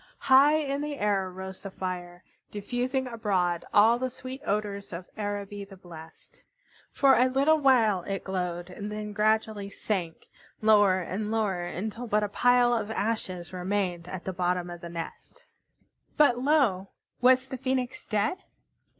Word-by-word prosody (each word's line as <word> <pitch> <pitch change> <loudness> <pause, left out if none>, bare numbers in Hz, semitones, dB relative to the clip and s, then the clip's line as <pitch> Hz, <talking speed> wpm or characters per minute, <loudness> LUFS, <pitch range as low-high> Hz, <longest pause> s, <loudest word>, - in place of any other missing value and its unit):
High 275 +3 +5
in 285 -2 -1
the 295 -1 -4
air 200 -4 0
rose 190 +1 -8
the 195 - -6
fire, 180 -2 -6 0.3
diffusing 245 +5 -2
abroad 195 -8 -1
all 225 +3 +5
the 255 0 -1
sweet 255 +1 -8
odors 200 -1 -2
of 180 +1 -7
Araby 205 -1 -4
the 195 -1 -13
blest. 160 -3 -14 0.5
For 275 -1 +4
a 250 - +4
little 280 +5 +3
while 230 -9 +4
it 195 -1 -3
glowed, 180 -1 -4
then 210 0 -5
gradually 215 -1 +1
sank, 185 -5 -3 0.3
lower 205 -4 +4
and 205 +4 -4
lower, 205 -5 0
until 220 +7 -5
but 210 -1 +1
a 205 - -1
pile 245 +3 +4
of 220 -3 -1
ashes 205 -6 -3
remained 180 -2 -2
at 185 -1 -6
the 190 - -3
bottom 180 -1 -1
of 175 -1 -9
the 170 - -7
nest. 165 -1 -8 0.7
But 265 -5 +5
lo! 255 -9 +2 0.3
Was 255 +1 +4
the 260 - -4
Phoenix 260 -1 -2
dead? 215 - 0
205 Hz, 150 wpm, -28 LUFS, 185-245 Hz, 0.7 s, High